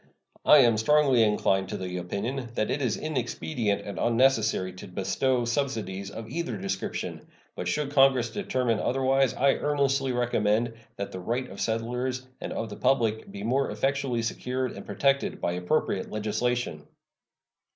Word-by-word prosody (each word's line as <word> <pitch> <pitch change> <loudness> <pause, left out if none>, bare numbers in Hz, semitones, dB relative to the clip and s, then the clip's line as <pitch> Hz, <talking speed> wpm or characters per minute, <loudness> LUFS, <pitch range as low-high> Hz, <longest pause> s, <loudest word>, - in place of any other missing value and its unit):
I - - +9
am 120 -3 +4
strongly 135 +1 +4
inclined 95 -3 +2
to - - -3
the 90 -1 -4
opinion 115 +8 -3
that 110 - 0
it 145 - -1
is 120 -5 0
inexpedient 115 - -2
and 100 -2 -5
unnecessary 115 -6 +2
to 90 - -10
bestow 120 +7 0
subsidies 115 -7 -2
of 110 +2 -8
either 130 -3 -3
description; 95 0 -4 0.3
but 90 - -4
should 140 +9 -1
Congress 135 -4 +4
determine 125 - 0
otherwise 135 0 +2
I 135 +1 +4
earnestly 140 -2 +1
recommend 120 -2 +1 0.2
that 100 - -5
the 95 - -6
right 120 +7 -2
of - - -7
settlers 125 +3 -2 0.2
and - - -4
of 115 - -3
the - - -7
public 115 -4 +1
be 100 - -7
more 130 +5 +1
effectually 135 -4 0
secured 125 +3 -2
and - - -10
protected 140 0 +1
by - - 0
appropriate 90 0 -1
legislation. 110 -5 -2
120 Hz, 150 wpm, -27 LUFS, 105-135 Hz, 0.3 s, I